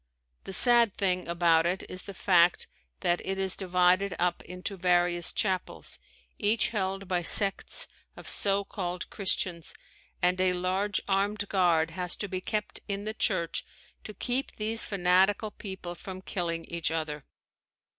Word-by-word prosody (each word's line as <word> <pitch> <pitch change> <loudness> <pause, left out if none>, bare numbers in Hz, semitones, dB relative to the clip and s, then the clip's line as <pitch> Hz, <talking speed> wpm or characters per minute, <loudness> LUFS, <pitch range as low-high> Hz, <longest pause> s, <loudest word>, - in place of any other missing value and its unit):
The - - -6
sad 235 0 +5
thing 185 -3 +1
about 170 -1 +3
it 185 +2 -1
is 185 - -1
the 200 - -9
fact 175 -2 +3 0.4
that 175 0 +2
it 190 0 -2
is 190 -1 0
divided 180 0 +2
up 175 0 0
into 180 +2 -6
various 175 -1 +2
chapels, 190 -4 -2 0.4
each 215 +2 +2
held 195 -3 -2
by 180 -1 0
sects 195 +3 +2 0.3
of - - -11
so 200 0 +5
called 180 -3 -5
Christians, 180 -4 -1 0.4
and 180 +1 +2
a 185 -1 +4
large 185 +3 0
armed 205 +1 0
guard 170 -4 +2
has 180 +1 -2
to 205 - -4
be 185 -1 -4
kept 210 +2 -3
in 200 0 -3
the 215 - -3
church 185 -6 +1 0.4
to 215 - -9
keep 250 +7 -2
these 220 +1 -1
fanatical 195 +2 +2
people 190 -4 -7
from 185 +1 -8
killing 170 -4 -3
each 170 -1 -2
other. 155 -3 -3
185 Hz, 150 wpm, -28 LUFS, 175-200 Hz, 0.4 s, sad